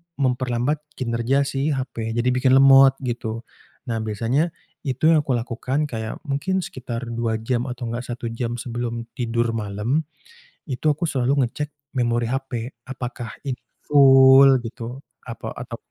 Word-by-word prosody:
memperlambat 130 +1 0 0.2
kinerja 120 +3 0
si 140 +2 -1
HP, 115 -4 -4
jadi 120 +1 +1
bikin 130 +1 +3
lemot, 135 0 +7
gitu. 115 -2 -3 0.5
Nah, 115 - -1
biasanya 115 +8 0 0.4
itu 140 +5 +3
yang 160 - +5
aku 130 - +2
lakukan, 125 +4 -2
kayak 110 -2 -4
mungkin 170 +7 -1
sekitar 125 -5 -6
2 115 -1 -1
jam 120 +1 -1
atau 125 0 -6
nggak 120 +1 -4
1 120 -1 -5
jam 115 0 -3
sebelum 120 -1 -4
tidur 115 -1 0
malam, 115 +7 -2 0.6
itu 130 +4 -2
aku 150 +4 -4
selalu 135 +1 +1
ngecek 150 +5 -5 0.3
memori 120 -1 +1
HP, 130 -2 -3 0.2
apakah 125 -3 -6
ini 135 -3 -3 0.2
full 135 -1 +7
gitu, 120 +2 -7 0.3
apa, 115 - -6
atau 120 -1 -6
125 Hz, 145 wpm, -23 LUFS, 115-135 Hz, 0.6 s, lemot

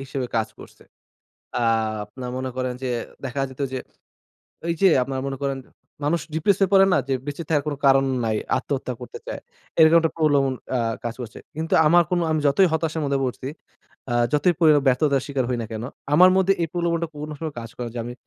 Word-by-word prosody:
হিসেবে 135 -1 -3
কাজ 110 -1 +1
করছে। - - -14 0.8
আ - - 0 0.4
আপনার 125 +4 -8
মনে 130 0 -3
করেন 130 -1 -2
যে 130 - -1 0.3
দেখা 135 +1 -3
যেত 130 +2 -13
যে, 130 - -2 0.9
এইযে 180 +3 +4
আপনার 135 0 -4
মনে 135 -1 -3
করেন 140 -1 -1 0.5
মানুষ 165 +4 +1
depress 175 +5 +2
হয়ে 195 -1 +2
পড়ে 195 0 +7
না? - - +4
যে 135 - +1
বেঁচে 145 +3 -4
থাকার 150 -3 +2
কোনো 145 - -2
কারণ 135 0 +5 0.2
নাই, 110 -1 0 0.2
আত্মহত্যা 130 -2 -3
করতে 125 - -8
চায়। - - -5 0.4
এরকম 160 +1 +8
একটা 165 - +1
প্রলোভন 140 -4 +3 0.2
আ - - 0 0.3
কাজ 120 - -2
করছে। 120 -2 -8 0.2
কিন্তু 160 +1 -2
আমার 175 +2 +6
কোন 180 - +1
আমি 155 - +2
যতই 180 +7 +5
হতাশার 160 0 -1
মধ্যে 140 -1 0
পড়ছি, 130 0 -3 0.7
আ - - 0 0.2
যতই 150 +4 +3
পড়ি 160 -3 +6 0.2
ব্যর্থতার 135 +1 +3
শিকার 140 -3 -1
হই 125 - 0
না - - -5
কেন? 110 +1 -4 0.3
আমার 180 +4 +8
মধ্যে 190 0 +4
এই 165 - 0
প্রলোভনটা 170 -1 0
কোন 150 +1 -6
সময় 155 -1 -5
কাজ 115 0 -8
করে 120 -1 -4
যে, 120 - -4
আমি 120 - -5
140 Hz, 200 wpm, -23 LUFS, 130-165 Hz, 0.9 s, এরকম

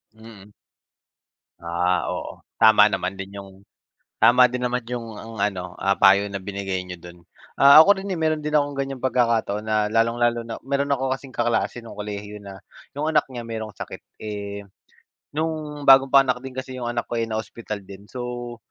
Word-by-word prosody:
Mm. 110 -3 -14 1.1
Ah, 85 +1 0
oo. - - -5 0.2
Tama 110 -1 +7
naman 100 -2 -3
din 95 +1 -7
yung 100 -1 -9 0.7
tama 125 +1 +6
din 125 - -3
naman 125 0 -1
yung 115 -3 -5
ang 115 0 -10
ano, 95 -3 -2
ah, 100 0 +2
payo 100 +1 +6
na 100 - -4
binigay 95 -2 -3
niyo 90 - -7
dun. 85 +1 -12 0.4
Ah, 140 +2 +9
ako 200 +2 +4
rin 200 - -6
eh, 180 - -2
meron 155 -1 0
din 150 - -3
akong 145 -1 +1
ganyang 135 -1 -3
pagkakataon 115 -5 +1
na 110 - +1 0.2
lalong-lalo 115 +1 +1
na 115 - -5
meron 140 +2 -1
ako 130 0 -2
kasing 135 0 -13
kaklase 120 0 0
nong 115 -3 -11
kolehiyo 105 0 -6
na, 95 -1 -10 0.4
yung 150 +2 -2
anak 150 -2 +4
niya 120 -2 -6
merong 110 -1 -5
sakit. - - -8 0.2
Eh, 100 -1 -6 0.7
nong 155 -2 -3
bagong 135 0 +8
panganak 135 -2 +5
din 135 - -7
kasi 130 0 -6
yung 120 - -4
anak 120 -1 -2
ko, 120 - -3
eh, - - +1
na 110 - -3
hospital 110 -1 -7
din, 100 +1 -12
so 120 -1 -6
115 Hz, 185 wpm, -23 LUFS, 100-130 Hz, 1.1 s, Ah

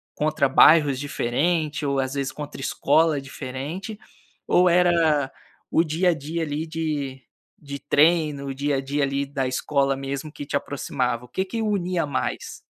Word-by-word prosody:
contra 150 -1 +1
bairros 145 +1 +6
diferentes 150 +3 -1
ou, 140 -1 0
às 130 0 -1
vezes, 140 -2 -2
contra 145 -2 -8
escolas 150 +3 +2
diferentes? 140 - -6 0.5
Ou 180 0 +4
era 170 -5 +3 0.4
o 165 - +3
dia 170 +3 +1
a - - +1
dia 160 +2 -4
ali 150 +1 -3
de 150 -5 -3 0.4
de 140 -2 -7
treino, 150 0 +2
o 135 - -4
dia 140 +1 -1
a 135 - 0
dia 140 +2 -2
ali 140 0 0
da 135 -1 -2
escola 135 +1 0
mesmo 135 +2 -5
que 145 - -8
te 140 - -4
aproximava? 125 -4 -2
O - - -16
que 190 - -2
que 195 +4 -5
unia 185 -6 0
mais? 135 -2 -3
145 Hz, 165 wpm, -24 LUFS, 135-160 Hz, 0.5 s, bairros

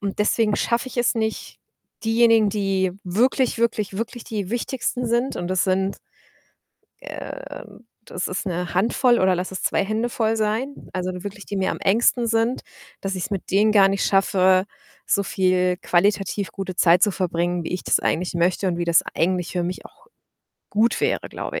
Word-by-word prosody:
Und 200 -1 -4
deswegen 210 0 +2
schaffe 235 +2 0
ich - - -12
es 240 -1 +2
nicht, 220 -1 -3 0.5
diejenigen, 225 -1 +4
die 195 -3 0
wirklich, 245 +8 +1
wirklich, 215 -4 0
wirklich 230 +2 -5
die 205 -4 -4
Wichtigsten 245 +1 -2
sind 240 +3 0
und 175 - -4
das 185 -1 +1
sind, 190 +1 0 1.1
ähm - - -9 0.2
das 180 - -4
ist 185 +3 -3
'ne 180 -1 -3
Handvoll 235 +6 +3
oder 185 -1 +3
lass 180 +2 -4
es 190 - -5
2 - - +1
Hände 220 +4 -1
voll 225 -1 0
sein, 220 +6 -1 0.2
also, 185 0 -2
nur 180 0 -8
wirklich 205 0 -7
die 200 - -4
mir 190 0 0
am - - -5
engsten 235 +4 +2
sind, 225 +2 +1 0.4
dass 195 -1 -3
ich's 185 +3 -4
mit 195 - -4
denen 210 +3 +4
gar 195 -2 +6
nicht 195 0 0
schaffe, 190 -1 +3 0.4
so 200 - +1
viel 185 -1 +1
qualitativ 195 0 +1
gute 190 -2 -5
Zeit 175 0 +5
zu 210 - +4
verbringen, 175 -1 -1
wie - - -5
ich 180 - -3
das - - +2
eigentlich 180 +2 -1
möchte 175 +3 +1
und 170 - -2
wie 175 - -2
das 170 -1 +4
eigentlich 180 +1 0
für 175 -1 -1
mich 180 +2 -5
auch - - -17 0.6
gut 220 +3 +2
wäre, - - 0
glaube - - -5
195 Hz, 185 wpm, -22 LUFS, 185-225 Hz, 1.1 s, gar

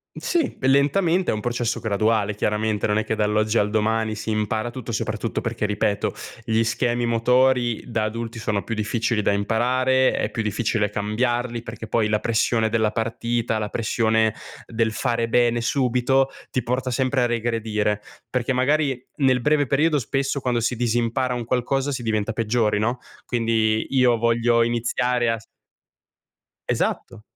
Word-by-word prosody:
Mh, - - -7
sì. 335 -6 0
E 130 - 0
lentamente, 165 +7 +3
è - - 0
un 105 - -3
processo 120 +1 -2
graduale 110 0 +1
chiaramente, 105 0 0
non 105 0 +1
è 110 - 0
che 110 - -1
dall'oggi 110 +1 +1
al 105 0 +1
domani 110 0 0
si 110 +1 -5
impara 110 +2 -1
tutto, 120 -2 -7
soprattutto 110 +1 -2
perché 115 -1 -3
ripeto, 105 0 -1 0.3
gli 110 -1 +2
schemi 120 +1 0
motori 120 0 +2
da 115 -3 -1
adulti 115 +1 -4
sono 105 -2 -1
più 115 - -4
difficili 110 +1 -1
da 100 - +2
imparare, 130 +5 +2
è - - -1
più 115 - -2
difficile 105 0 0
cambiarli 120 +3 -1
perché 115 -1 -8
poi 110 -1 +1
la 105 0 +1
pressione 110 0 +1
della 110 -1 +1
partita, 115 0 -1
la 105 -1 -2
pressione 110 -1 +1 0.3
del 115 -1 0
fare 115 0 -1
bene 120 0 +2
subito, 130 +1 +2 0.2
ti 130 - -1
porta 125 +2 -2
sempre 130 +1 +1
a - - +3
regredire. 110 -3 -1 0.3
Perché 125 +1 -1
magari 135 0 +1
nel 130 -3 +3
breve 145 +3 +2
periodo 150 +4 +2
spesso 135 +2 -1
quando 125 -2 0
si 120 +2 -1
disimpara 120 +2 0
un 120 -1 -3
qualcosa 130 +3 0
si 130 -3 -3
diventa 110 -1 -1
peggiori, 110 -1 +1
no, 120 +4 0 0.3
quindi 115 -2 +1
io 125 -3 +4
voglio 115 +1 +2
iniziare 120 +1 0
a 115 - -1
s 105 - -17 1.2
Esatto. 115 -3 -2
115 Hz, 160 wpm, -23 LUFS, 110-125 Hz, 1.2 s, io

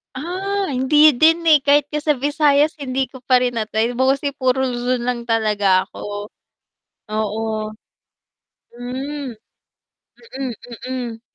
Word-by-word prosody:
Ah, 380 +7 -2
hindi 265 +2 -1 0.2
din, 325 +1 +6
eh, 305 - +8
kahit 290 0 +4
nga 300 - -3
sa 300 - +5
Visayas 295 +1 +2
hindi 265 -1 -2
ko 260 - -11
pa 250 -1 +4
rin 245 -2 -1
na-try 220 +2 -1
mostly 270 +2 +2
kasi 280 - -14
puro 260 0 +1
Luzon 245 -1 -1
lang 240 -1 -3
talaga 210 -5 +2
ako, 205 0 -7 0.8
oo. 215 0 -2 1.3
Hmm, 260 +4 -5 1.0
mm 260 - -7
mm. 240 -3 -4
255 Hz, 125 wpm, -20 LUFS, 235-290 Hz, 1.3 s, eh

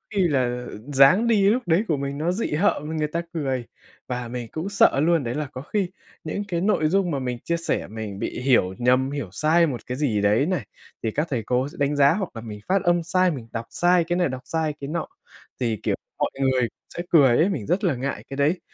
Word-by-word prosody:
khi 200 - +3
là, 140 -5 +2 0.2
ờ, - - -8 0.2
dáng 155 - +6
đi 205 -4 +4
lúc 245 +4 +1
đấy 170 +5 +3
của 155 - +1
mình 140 0 -3
nó 160 +4 0
dị 200 +6 -2
hợm 160 -1 0
người 155 -1 0
ta 165 +3 -2
cười 135 -6 -2 0.4
và 125 -1 -3
mình 120 0 -5
cũng 160 +5 -4
sợ 200 -8 +4
luôn 165 0 +3
đấy 120 0 -3
là 150 -1 -2
có 130 - -6
khi 190 +5 -1 0.3
những 180 +6 -3
cái 170 -3 -1
nội 190 -5 +2
dung 190 0 +1
mà 140 - -1
mình 125 -2 -3
chia 170 - 0
sẻ 165 - -2
mình 105 -2 -6
bị - - -3
hiểu 125 -8 +3
nhầm, 125 +2 +2
hiểu 140 -9 -4
sai 160 - +3
một 130 -5 -4
cái 125 - -4
gì 125 -8 +1
đấy 105 +6 +3
này, 175 - -1 0.4
thì 110 - 0
các 150 +8 -1
thầy 120 -5 -1
cô 125 +4 0
sẽ 150 - -12
đánh 145 +1 +1
giá 140 +1 +5
hoặc 190 -1 -2
là 115 - -6
mình 105 -2 -8
phát 195 0 +2
âm 175 -2 +2
sai, 185 +2 +2
mình 125 -7 -6
đọc 115 0 -3
sai 175 0 +3
cái 175 +1 -1
này 175 -4 +2
đọc 130 0 -5
sai 160 +2 -1
cái 140 - -4
nọ, 165 +2 -3 0.5
thì, 115 -3 0
kiểu, - - +1 0.2
mọi - - +1
người 130 -3 +2 0.3
sẽ 175 - -3
cười 135 -7 +6
ấy, 170 +5 +4
mình 140 - -3
rất 185 - 0
là 175 -8 +2
ngại 135 +3 -4
cái 135 - -6
đấy. 150 +6 +2
145 Hz, 250 wpm, -24 LUFS, 125-175 Hz, 0.5 s, dáng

